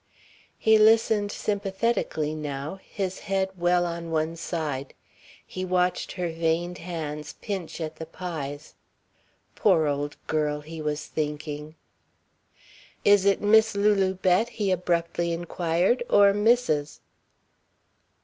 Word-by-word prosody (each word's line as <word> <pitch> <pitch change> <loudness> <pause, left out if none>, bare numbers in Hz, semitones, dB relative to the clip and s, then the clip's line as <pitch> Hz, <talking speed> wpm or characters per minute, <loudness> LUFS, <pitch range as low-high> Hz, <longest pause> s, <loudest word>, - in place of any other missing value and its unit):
He 220 0 +4
listened 215 -1 +4
sympathetically 200 -7 -1
now, 150 +3 -5
his 190 -2 -4
head 190 -1 -1
well 175 0 +2
on 170 -1 -4
one 160 0 -1
side. 150 -5 -4 0.5
He 185 - -6
watched 180 0 0
her 180 -1 -2
veined 165 +2 -1
hands 155 -3 -5
pinch 190 -6 -5
at 160 -1 -5
the 160 - -7
pies. 155 -4 -6 0.8
"Poor 160 - +3
old 145 0 -2
girl," 150 -1 -1
he 160 +1 -8
was 150 -1 -2
thinking. 150 0 -4 1.3
"Is 205 -1 +6
it 200 -1 +3
Miss 220 +1 +5
Lulu 200 -2 +2
Bett?" 185 +5 +2
he 210 -4 -1
abruptly 170 -1 0
inquired. 175 +6 0
"Or 200 -1 +6
Mrs.?" 205 -9 +1
175 Hz, 115 wpm, -26 LUFS, 155-195 Hz, 1.3 s, Is